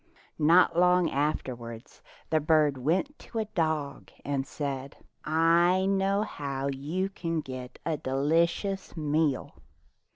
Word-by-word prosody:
Not 165 +4 +5
long 180 0 +4
afterward 125 -5 -2 0.5
the 160 - +4
bird 155 -2 +3
went 180 - 0
to 230 - -9
a 220 - 0
dog 155 -8 -2 0.2
and 140 -1 -1
said, 140 -2 -5 0.3
"I 170 +4 +3
know 195 +1 +1
how 140 -7 -4
you 150 +8 -2
can 165 -4 -3
get 130 -2 -8
a 160 -1 0
deli 145 +6 +2
cious 195 +1 -5
meal." 150 -2 0
155 Hz, 125 wpm, -28 LUFS, 140-180 Hz, 0.5 s, Not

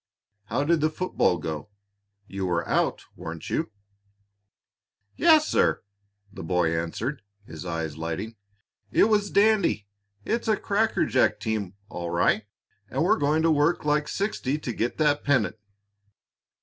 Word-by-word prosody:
How 140 - -1
did 165 +1 +2
the 155 - +3
football 155 - +1
go? 80 +3 -5 0.6
You 95 -1 -4
were 85 -1 -1
out, - - 0
weren't - - -7
you?" - - 0 1.5
"Yes, 315 -2 +5
sir," - - +2 0.5
the - - -8
boy 85 -1 +1
answered, 110 - -3 0.2
his 80 +1 -8
eyes 80 -3 -3
lighting. 95 +8 -4 0.5
"It - - +4
was 205 -2 +2
dandy! 200 - +3 0.4
It's 235 +1 -1
a 215 -1 +3
crackerjack 205 -10 +1
team, 105 -4 -3
all 85 -3 -5
right, 85 +5 +2 0.4
and - - 0
we're - - +3
going 150 +2 +2
to 165 - +4
work 150 +2 +2
like 150 0 +1
sixty 175 -9 -1
to 130 -5 -4
get 115 +3 -2
that 150 -2 +2
pennant." 130 -6 +1
130 Hz, 135 wpm, -26 LUFS, -, 1.5 s, Yes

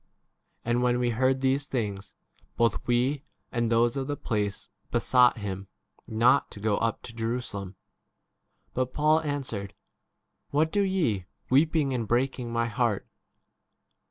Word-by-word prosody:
And 120 +1 +1
when 125 0 +2
we 120 -1 +1
heard 130 +3 +2
these 135 +2 +1
things, 105 -7 -3 0.4
both 115 -2 +1
we 130 +4 +1 0.3
and 120 -1 0
those 115 +1 +3
of 135 -1 -2
the 145 0 -2
place 105 -5 -2 0.2
besought 125 -2 +4
[him] 100 -2 -5 0.4
not 120 +5 +4
13 - - -40
to - - -10
go 105 0 +1
up 115 -1 -1
to 115 - -9
Jerusalem. 115 -4 -4 1.0
But 130 0 -2
Paul 155 +1 +4
answered, 130 -10 -4 0.7
"What 155 +2 +2
do 205 - +2
ye, 160 - 0 0.2
weeping 145 0 +3
and 115 -3 -2
breaking 125 0 0
my 115 0 +1
heart 115 -2 0
120 Hz, 140 wpm, -27 LUFS, 110-135 Hz, 1.0 s, besought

